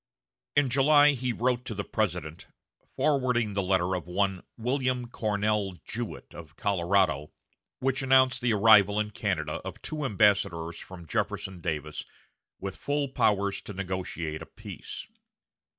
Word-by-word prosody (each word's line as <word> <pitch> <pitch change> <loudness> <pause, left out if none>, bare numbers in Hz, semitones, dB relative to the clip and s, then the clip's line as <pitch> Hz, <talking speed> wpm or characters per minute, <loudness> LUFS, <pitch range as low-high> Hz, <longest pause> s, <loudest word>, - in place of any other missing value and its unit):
In 145 -1 +4
July 145 +2 +6
he 125 -2 -2
wrote 125 +1 0
to 110 - -4
the 100 - -2
President, 90 -8 -3 0.5
forwarding 125 -7 +1
the 100 - 0
letter 95 -1 +1
of 90 -1 -5
one 95 0 0 0.2
"Wm. 125 +1 0
Cornell 105 -3 0
Jewett 115 0 -6
of 80 -3 -11
Colorado," 90 -6 +1 0.5
which 135 +1 0
announced 130 -1 +4
the 120 -1 +2
arrival 105 -1 +6
in 105 0 -1
Canada - - -2
of - - -7
two 155 -1 -4
ambassadors 95 - +2
from 90 -2 -10
Jefferson 90 +3 -3
Davis 75 -2 -3 0.6
with 95 -1 -5
full 145 -1 -1
powers 100 -6 +1
to 105 - -8
negotiate 90 -4 -4
a - - -8
peace. - - -8
105 Hz, 135 wpm, -28 LUFS, 90-125 Hz, 0.6 s, July